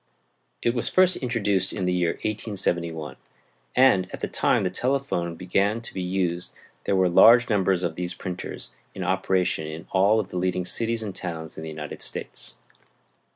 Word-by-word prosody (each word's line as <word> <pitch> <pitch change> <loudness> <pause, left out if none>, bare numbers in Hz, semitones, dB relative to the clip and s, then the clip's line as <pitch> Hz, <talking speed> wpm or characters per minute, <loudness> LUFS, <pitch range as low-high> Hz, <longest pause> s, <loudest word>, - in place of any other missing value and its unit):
It 120 - +2
was 120 - 0
first 185 -1 +4
introduced 105 -7 0
in 95 -4 -2
the 90 - +1
year 85 -2 +1
1871, 85 -7 -2 0.6
and 100 -8 +5
at - - -6
the - - -2
time - - +2
the - - 0
telephone 125 -11 -1
began 100 +5 0
to 115 - -9
be 95 - -3
used 90 -1 -2 0.3
there 100 - +1
were 95 -1 +4
large 115 +7 +7
numbers 95 -3 +2
of 85 -2 -1
these 90 +1 -3
printers 90 -2 -6 0.2
in - - -4
operation 95 -4 0
in 80 +1 -7
all 100 +3 +4
of 100 - -3
the 90 - -5
leading 90 0 0
cities 115 +3 0
and 100 -3 -5
towns 80 -3 -6
in - - -7
the 80 - -6
United 75 -1 -7
States. - - -4
95 Hz, 175 wpm, -25 LUFS, 85-110 Hz, 0.6 s, large